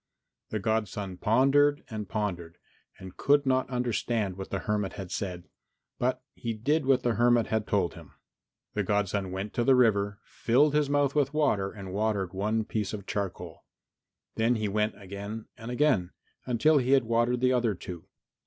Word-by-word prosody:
The 110 - -2
godson 105 -3 -2
pondered 140 +6 +3
and 105 -3 -6
pondered 90 -5 -3 0.4
and 95 -1 -10
could 145 0 +3
not 130 -1 +1
understand 120 -5 -1
what 95 0 -7
the - - -2
hermit 105 -2 -1
had 95 -3 -7
said, 90 -3 -4 0.5
but 130 +1 0
he 115 -1 -4
did 140 +6 0
what 135 -2 +3
the 120 - +2
hermit 120 0 +3
had 110 -1 -1
told 95 -4 +1
him. 85 -3 -12
X - - -26 0.6
The 105 - 0
godson 100 -1 0
went 95 +2 -4
to 120 - 0
the 130 +2 +5
river, 100 -5 +3
filled 140 +6 +2
his 150 -1 +2
mouth 145 -1 +2
with 145 -1 +1
water 105 -11 +1
and 95 -3 -8
watered 100 -3 -1
one 105 +3 0
piece 105 -2 -3
of 100 -2 -6
charcoal; 100 -2 -4 0.7
then 115 +2 +2
he 110 -2 -1
went 105 +2 -1
again 100 +3 -7
and 115 0 -9
again, 125 -9 +1 0.3
until 140 +5 +4
he 130 +1 +2
had 135 -2 +5
watered 120 +2 +1
the 130 +1 +3
other 120 -4 +1
two. 90 -1 -9
110 Hz, 175 wpm, -28 LUFS, 100-125 Hz, 0.7 s, the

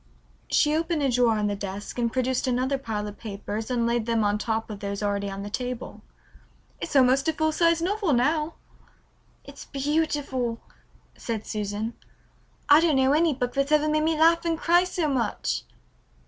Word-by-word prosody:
She 300 0 +3
opened 325 -1 0
a 270 - +2
drawer 240 -2 +3
of 210 0 0
the 205 - -1
desk 200 +3 -6
and 235 -1 +1
produced 255 +1 0
another 255 +2 0
pile 215 -5 -4
of 205 - -9
papers 215 +1 -5
and 240 -2 0
laid 235 -1 0
them 230 -2 +1
on 205 0 +1
top 220 0 -2
of 205 - -7
those 200 0 -4
already 200 -1 -1
on 195 0 -6
the 205 - -6
table. 250 +1 -5 0.8
"It's - - -5
almost 265 +1 +4
a 320 - +2
full 315 0 +1
sized 335 +1 +2
novel 400 -1 0
now." 300 +5 +1 0.9
"It's - - -11
beautiful," 280 -4 -1 0.6
said 225 -3 -4
Susan. 210 +2 -3 0.7
"I 295 +2 +7
don't 330 -3 +3
know 265 +1 +3
any 315 -1 +3
book 245 -1 -2
that's 275 +1 0
ever 305 0 +4
made 305 0 +2
me 315 0 +1
laugh 330 +1 +5
and 335 -1 0
cry 345 +2 +3
so 355 -3 -1
much." 210 - -1
255 Hz, 180 wpm, -26 LUFS, 220-305 Hz, 0.9 s, I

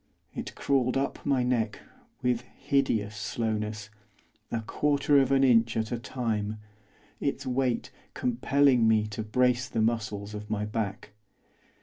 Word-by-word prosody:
It - - -6
crawled 130 -2 +1
up 135 +1 -2
my 135 -3 +3
neck, 115 -4 0 0.5
with 125 -2 +1
hideous 120 -5 -1
slowness, 110 -1 -3 0.6
a 115 - -2
quarter 145 +4 +2
of 135 -1 +2
an 135 0 +4
inch 115 -3 +4
at 110 -1 -1
a 120 - -1
time, 110 -3 -2 0.6
its - - -2
weight 130 -1 0 0.2
compelling 125 0 +3
me 110 -1 +4
to 105 +1 -5
brace 125 +3 +1
the 115 - -2
muscles 110 -2 -1
of 105 0 -7
my 105 -1 -1
back. 105 -1 -4
115 Hz, 135 wpm, -28 LUFS, 110-125 Hz, 0.6 s, an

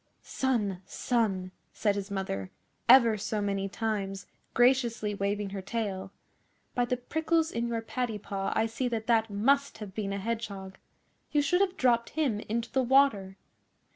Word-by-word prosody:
'Son, 210 -8 -1
son!' 200 -7 0 0.2
said 205 -2 +1
his 200 0 -4
mother 190 - -3 0.4
ever 235 -4 +7
so 215 +1 -2
many 195 -1 -1
times, 195 -3 -3 0.3
graciously 240 -4 +3
waving 200 0 -2
her 195 -1 -4
tail, 195 -2 -3 0.6
'by 245 - +1
the 250 +1 -1
prickles 320 +5 0
in 235 +1 -1
your 230 -1 -2
paddy 235 -1 -2
paw 195 -1 -3
I 220 - +3
see 230 +3 -2
that 225 -2 -2
that 225 -1 +3
must 275 +8 +2
have 210 -3 -8
been 200 -1 -3
a 200 - -2
Hedgehog. 200 -3 -4 0.5
You 295 -1 +3
should 355 +6 +2
have 380 -2 +1
dropped 235 -2 +3
him 265 -10 +1
into 230 +2 -3
the 265 - +2
water. 240 -7 +3
220 Hz, 160 wpm, -29 LUFS, 200-245 Hz, 0.6 s, ever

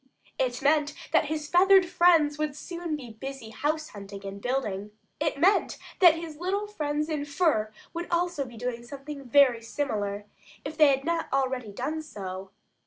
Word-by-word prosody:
It 250 -1 -1
meant 295 0 +3 0.2
that - - +4
his 305 0 -3
feathered 375 +3 +6
friends 330 -4 +4
would 305 -2 -1
soon 340 0 -4
be 255 -6 -8
busy 250 0 -8
house 310 +5 -1
hunting 200 -1 -9
and 195 +1 -7
building. 210 -6 -2 0.3
It 305 -1 0
meant 380 +7 +3 0.2
that 350 -4 +8
his 330 -2 -7
little 385 +5 -1
friends 300 -7 -2
in 305 -3 -2
fur 285 -8 +1 0.2
would 340 +1 -4
also 350 -3 0
be 240 -2 -11
doing 240 0 -3
something 280 +2 -8
very 255 -2 +4
similar, 210 -5 -3 0.4
if 300 +2 -5
they 305 -1 +6
had 270 -1 +2
not 335 0 -1
already 260 -4 0
done 310 +10 -3
so. 190 -9 -7
290 Hz, 170 wpm, -27 LUFS, 240-315 Hz, 0.4 s, that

